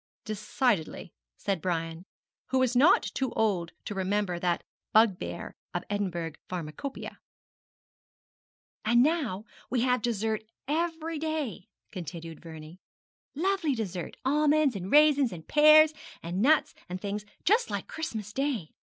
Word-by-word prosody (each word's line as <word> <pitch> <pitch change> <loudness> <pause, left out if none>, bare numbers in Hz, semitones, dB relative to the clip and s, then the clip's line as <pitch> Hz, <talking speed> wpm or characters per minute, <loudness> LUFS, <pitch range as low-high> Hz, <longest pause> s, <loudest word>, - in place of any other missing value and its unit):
'Decidedly,' 215 - -1 0.2
said 195 -4 -2
Brian, 165 -1 -2 0.4
who 260 - 0
was 260 -1 +2
not 295 +9 +6
too 265 -2 -2
old 190 -6 0
to - - -4
remember 190 -2 -1
that 175 -1 0 0.3
bugbear 215 -4 +2 0.2
of - - 0
the - - -5
Edinburgh 175 -5 -2 0.2
pharmacopæia. 175 - -5 1.7
'And 240 +2 +5
now 270 - 0 0.2
we 245 -2 +1
have 250 -1 +2
dessert 220 -1 -1 0.3
every 325 +1 -1
day,' 305 - -3 0.2
continued 165 -1 -7
Vernie; 160 +1 -10 0.6
'lovely 335 -3 +1
dessert 190 -6 -4
almonds 295 -1 +3
and 190 0 -5
raisins, 290 -4 +6
and 165 -3 -9
pears, 305 +1 +7 0.3
and 175 +3 -2
nuts, 300 +5 +4 0.2
and 180 +1 -4
things, 205 +1 -3 0.2
just 455 +5 +3
like - - -3
Christmas 220 -10 -5
Day. 265 - -1
220 Hz, 125 wpm, -29 LUFS, 180-290 Hz, 1.7 s, pears